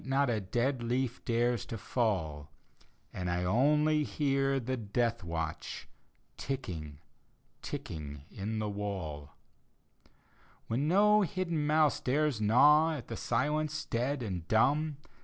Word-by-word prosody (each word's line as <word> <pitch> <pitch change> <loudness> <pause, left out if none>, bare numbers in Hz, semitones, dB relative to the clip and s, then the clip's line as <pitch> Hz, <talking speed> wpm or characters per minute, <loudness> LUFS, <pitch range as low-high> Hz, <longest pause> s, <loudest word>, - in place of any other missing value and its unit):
Not 135 +1 +1
3 115 -2 +1
dead 125 +1 0
leaf 125 +1 -1
dares 120 0 +1
to 115 - -5
fall, 85 - -1 0.6
And 90 -1 -3
I 90 +1 0
only 150 +9 +3
hear 135 -2 +1
the 130 +1 -2
death 115 +1 -1
watdi 80 -2 -4 0.5
Tickii^, 85 - -4 0.7
ticking 75 -2 -6
in 105 +3 -4
the 110 -1 -1
wall 95 -8 -5 0.6
— - - -33
When 130 +6 0
no 210 +4 +5
hidden 170 -6 -1
mouse 155 -1 +3
dares 140 -3 0
gnaw 150 +9 +5
At 135 - -8
the 115 - -4
silence 150 +7 -1
dead 125 +3 -1
and 90 -6 -4
dumb. 145 +6 +2
120 Hz, 125 wpm, -31 LUFS, 100-145 Hz, 0.7 s, no